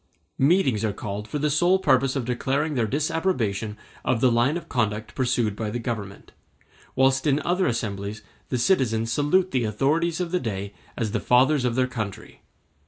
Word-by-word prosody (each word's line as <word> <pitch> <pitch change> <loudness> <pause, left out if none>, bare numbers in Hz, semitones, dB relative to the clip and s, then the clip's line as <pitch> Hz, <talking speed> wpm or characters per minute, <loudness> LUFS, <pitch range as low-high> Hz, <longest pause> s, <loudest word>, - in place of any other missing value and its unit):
Meetings 135 - +3
are 110 -2 0
called 105 +1 -5
for 150 - -3
the 150 +1 0
sole 175 +5 +4
purpose 135 -7 +2
of 135 -4 -2
declaring 135 +5 -1
their 120 -5 0
disapprobation 130 - -1 0.3
of 120 - +1
the 125 0 +4
line 120 +7 +2
of 170 - -9
conduct 110 -2 -2
pursued 120 -5 0
by 110 0 -3
the 115 - -3
Government; 110 -4 -5 0.6
whilst 135 +1 +3
in 145 0 +3
other 180 +1 +1
assemblies 105 -2 -3 0.3
the 125 - 0
citizens 115 -6 +1
salute 175 +8 +2
the 130 -3 +1
authorities 155 - 0
of 175 -2 -2
the 180 - +1
day 100 - -4 0.2
as 110 -3 -1
the 110 - 0
fathers 130 +4 +3
of 120 -2 0
their 130 0 +3
country. 110 -4 -6
125 Hz, 175 wpm, -24 LUFS, 110-150 Hz, 0.6 s, sole